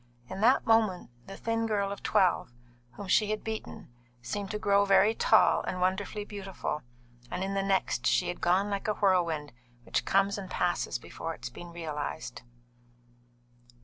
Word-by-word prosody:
In 190 Hz, -, -5 dB
that 245 Hz, +4 st, +4 dB
moment 215 Hz, -, +2 dB, 0.2 s
the 195 Hz, -, -8 dB
thin 225 Hz, 0 st, -1 dB
girl 200 Hz, -2 st, 0 dB
of 200 Hz, -, -6 dB
twelve, 180 Hz, -9 st, +2 dB, 0.4 s
whom 200 Hz, -, -8 dB
she 210 Hz, +2 st, +3 dB
had 215 Hz, 0 st, -2 dB
beaten, 220 Hz, -, -6 dB, 0.3 s
seemed 195 Hz, -, -4 dB
to 215 Hz, -, -2 dB
grow 200 Hz, -1 st, +3 dB
very 200 Hz, +2 st, +5 dB
tall -, -, +4 dB
and 185 Hz, -, -4 dB
wonderfully 190 Hz, +3 st, -1 dB
beautiful; 195 Hz, -7 st, -5 dB, 0.5 s
and 180 Hz, +1 st, -3 dB
in 195 Hz, +1 st, -2 dB
the 195 Hz, -, +1 dB
next, 195 Hz, -10 st, 0 dB
she 120 Hz, -, +2 dB
had 175 Hz, -, -4 dB
gone 190 Hz, +4 st, +2 dB
like 200 Hz, +1 st, -2 dB
a 210 Hz, -, +1 dB
whirlwind 170 Hz, -, +1 dB, 0.3 s
which -, -, -1 dB
comes 195 Hz, +1 st, +2 dB
and 190 Hz, -2 st, -7 dB
passes 180 Hz, -1 st, 0 dB
before 165 Hz, 0 st, -6 dB
it 120 Hz, -, -22 dB
has 120 Hz, -, -4 dB
been 175 Hz, +7 st, -10 dB
realised. 160 Hz, -2 st, -5 dB
195 Hz, 170 wpm, -29 LUFS, 175-205 Hz, 0.5 s, very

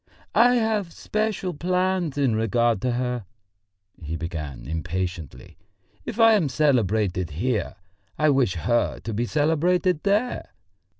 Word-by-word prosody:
"I 245 Hz, +1 st, +5 dB
have 220 Hz, -6 st, 0 dB
special 215 Hz, -3 st, -2 dB
plans 180 Hz, -1 st, 0 dB
in 135 Hz, -6 st, +2 dB
regard 115 Hz, -1 st, +1 dB
to 125 Hz, -1 st, 0 dB
her," 125 Hz, -2 st, -2 dB, 0.8 s
he 80 Hz, 0 st, -4 dB
began 80 Hz, -6 st, -6 dB
impatiently. 80 Hz, -2 st, -5 dB, 0.5 s
"If 235 Hz, -1 st, -6 dB
I 225 Hz, 0 st, +7 dB
am 180 Hz, -9 st, +2 dB
celebrated 110 Hz, -, +1 dB
here, 105 Hz, -, -2 dB, 0.4 s
I 155 Hz, -1 st, +3 dB
wish 130 Hz, -9 st, +2 dB
her 120 Hz, +8 st, 0 dB
to 115 Hz, -, -5 dB
be 120 Hz, +3 st, -1 dB
celebrated 160 Hz, +3 st, +1 dB
there. 210 Hz, +5 st, -1 dB
125 Hz, 125 wpm, -24 LUFS, -, 0.8 s, I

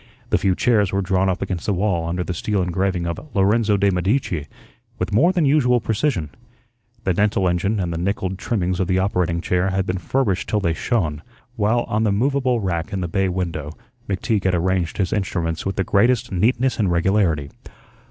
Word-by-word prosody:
The -, -, +3 dB
few 95 Hz, -2 st, +2 dB
chairs 105 Hz, -4 st, +2 dB
were 100 Hz, 0 st, 0 dB
drawn 95 Hz, 0 st, +1 dB
up 95 Hz, -, -1 dB
against 90 Hz, -3 st, -4 dB
the 100 Hz, -, +1 dB
wall 90 Hz, -4 st, 0 dB
under 90 Hz, +1 st, -1 dB
the 90 Hz, -, -4 dB
steel 100 Hz, +3 st, -1 dB
engraving 90 Hz, 0 st, -1 dB
of 85 Hz, -1 st, -3 dB, 0.2 s
"Lorenzo 105 Hz, +2 st, +3 dB
de' 100 Hz, 0 st, +3 dB
Medici" 90 Hz, -, -1 dB, 0.5 s
with -, -, -3 dB
more 160 Hz, -, +5 dB
than 175 Hz, -4 st, +1 dB
usual 130 Hz, -4 st, +3 dB
precision. 110 Hz, -, -1 dB, 0.7 s
The 95 Hz, -, +1 dB
dental 100 Hz, 0 st, +1 dB
engine 95 Hz, +5 st, 0 dB
and 85 Hz, -3 st, -2 dB
the 80 Hz, -, -3 dB
nickelled 95 Hz, 0 st, -2 dB
trimmings 90 Hz, -6 st, -1 dB
of 95 Hz, -, 0 dB
the 95 Hz, -1 st, +1 dB
operating 90 Hz, -3 st, 0 dB
chair 90 Hz, +1 st, +1 dB
had 95 Hz, 0 st, 0 dB
been 95 Hz, 0 st, -2 dB
furbished 100 Hz, 0 st, -1 dB
till 105 Hz, -, +1 dB
they 85 Hz, -5 st, 0 dB
shone, 80 Hz, -, -1 dB, 0.3 s
while 110 Hz, +2 st, +2 dB
on 110 Hz, +1 st, -1 dB
the 105 Hz, -, +2 dB
movable 130 Hz, +2 st, +1 dB
rack 90 Hz, 0 st, -2 dB
in 95 Hz, -2 st, -2 dB
the 85 Hz, -, -2 dB
bay 95 Hz, +3 st, 0 dB
window 85 Hz, -5 st, -4 dB, 0.3 s
McTeague 100 Hz, +1 st, -1 dB
had 95 Hz, -1 st, +3 dB
arranged 90 Hz, -1 st, 0 dB
his 95 Hz, -3 st, 0 dB
instruments 85 Hz, -4 st, -2 dB
with 95 Hz, -, -2 dB
the 95 Hz, -, 0 dB
greatest 115 Hz, +5 st, +2 dB
neatness 120 Hz, +6 st, +1 dB
and 100 Hz, -4 st, +2 dB
regularity. 85 Hz, -5 st, +1 dB
95 Hz, 195 wpm, -21 LUFS, 90-105 Hz, 0.7 s, more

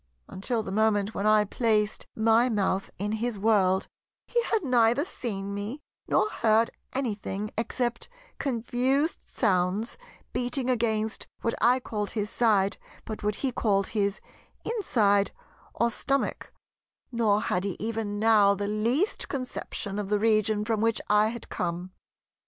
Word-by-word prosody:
Until 220 Hz, +4 st, -3 dB
the 190 Hz, -, -6 dB
moment 210 Hz, 0 st, +2 dB
when 200 Hz, -, -1 dB
I 215 Hz, 0 st, +5 dB
placed 215 Hz, 0 st, 0 dB
my 225 Hz, +3 st, +4 dB
mouth 195 Hz, -3 st, 0 dB
in 205 Hz, +2 st, -2 dB
his 220 Hz, 0 st, -2 dB
World, 195 Hz, -3 st, +2 dB, 0.4 s
he 480 Hz, -, +1 dB
had 440 Hz, -4 st, 0 dB
neither 245 Hz, +1 st, +3 dB
seen 200 Hz, -, -4 dB
me, 205 Hz, +8 st, -4 dB, 0.3 s
nor -, -, +3 dB
heard 225 Hz, -, +2 dB, 0.2 s
anything 210 Hz, -5 st, -3 dB
except 240 Hz, +1 st, -2 dB, 0.3 s
confused 260 Hz, +4 st, 0 dB
sounds 200 Hz, -, 0 dB, 0.3 s
beating 250 Hz, +1 st, 0 dB
against, 220 Hz, -2 st, -1 dB
what 230 Hz, -, 0 dB
I 250 Hz, +2 st, +5 dB
called 210 Hz, -4 st, -3 dB
his 210 Hz, -1 st, -3 dB
side, 200 Hz, -4 st, +2 dB, 0.3 s
but 220 Hz, -, -6 dB
what 210 Hz, 0 st, 0 dB
he 260 Hz, -, +1 dB
called 200 Hz, -5 st, +1 dB
his 200 Hz, -2 st, 0 dB, 0.5 s
inside 210 Hz, -, +2 dB, 0.4 s
or 235 Hz, 0 st, +2 dB
stomach; 275 Hz, +4 st, -1 dB, 0.6 s
nor 220 Hz, -4 st, +2 dB
had 185 Hz, -4 st, -1 dB
he 195 Hz, -3 st, -3 dB
even 220 Hz, -2 st, -2 dB
now 210 Hz, -2 st, +5 dB
the 200 Hz, +1 st, -3 dB
least 235 Hz, -, 0 dB
conception 230 Hz, -6 st, -4 dB
of 200 Hz, -2 st, -4 dB
the 210 Hz, -, +3 dB
region 215 Hz, -1 st, +2 dB
from 220 Hz, -1 st, 0 dB
which 225 Hz, 0 st, +2 dB
I 210 Hz, +1 st, +5 dB
had 235 Hz, +1 st, -5 dB
come. 175 Hz, +1 st, -3 dB
220 Hz, 140 wpm, -27 LUFS, 205-240 Hz, 0.6 s, I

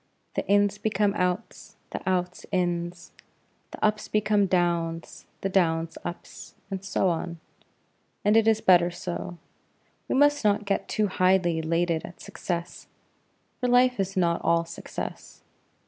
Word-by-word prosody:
The -, -, -1 dB
ins 205 Hz, 0 st, +3 dB
become 210 Hz, -2 st, +1 dB
outs, 180 Hz, -2 st, -3 dB
the -, -, -4 dB
outs 180 Hz, -1 st, -2 dB
ins; 175 Hz, -1 st, -2 dB, 0.6 s
the -, -, -2 dB
ups 215 Hz, 0 st, 0 dB
become 210 Hz, -1 st, +2 dB
downs, 170 Hz, -2 st, -1 dB
the -, -, 0 dB
downs 165 Hz, -4 st, +1 dB
ups; 175 Hz, -, -8 dB, 0.2 s
and 190 Hz, -1 st, -4 dB
so 195 Hz, -1 st, +1 dB
on 170 Hz, 0 st, -3 dB, 0.9 s
and 210 Hz, +1 st, +4 dB
it 225 Hz, 0 st, +5 dB
is 220 Hz, -1 st, +3 dB
better 175 Hz, -2 st, +5 dB
so. 175 Hz, 0 st, -5 dB, 0.7 s
We -, -, 0 dB
must 290 Hz, 0 st, +4 dB
not 210 Hz, 0 st, +2 dB
get 200 Hz, 0 st, -1 dB
too 215 Hz, -, +1 dB
highly 185 Hz, -3 st, +2 dB
elated 165 Hz, 0 st, 0 dB
at 175 Hz, -, -10 dB
success, 170 Hz, -1 st, -5 dB, 0.7 s
for 250 Hz, -, 0 dB
life 250 Hz, -1 st, +4 dB
is 195 Hz, 0 st, -2 dB
not 170 Hz, -2 st, +2 dB
all 170 Hz, 0 st, +2 dB
success. 170 Hz, -, -7 dB
185 Hz, 140 wpm, -26 LUFS, 170-205 Hz, 0.9 s, it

